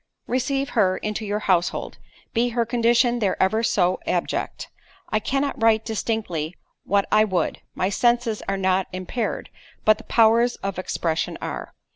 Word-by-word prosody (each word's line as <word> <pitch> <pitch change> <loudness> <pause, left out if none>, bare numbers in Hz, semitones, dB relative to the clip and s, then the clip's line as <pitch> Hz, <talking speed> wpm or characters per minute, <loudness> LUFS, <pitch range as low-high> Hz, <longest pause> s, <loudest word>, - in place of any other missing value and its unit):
"Receive 270 +2 -1
her 190 -4 +2
into 215 +1 -3
your 205 +1 -1
household, 180 -4 0 0.3
be 240 +1 +2
her 235 - +3
condition 240 +1 +2
there 200 -4 0
ever 215 +4 +2
so 185 -5 +2
abject. - - -2 0.4
I 215 - +1
cannot 275 +3 -1
write 225 -1 +4
distinctly 200 -7 -2 0.3
what 200 0 +2
I 215 0 +6
would—my 185 -1 -2
senses 235 +1 +1
are 195 - 0
not 190 0 +1
impaired, 185 +5 -3 0.3
but 215 0 +5
the - - -11
powers 230 +1 +4
of 195 -2 -3
expression 165 -3 -2
are. - - -6
215 Hz, 145 wpm, -23 LUFS, 190-235 Hz, 0.4 s, I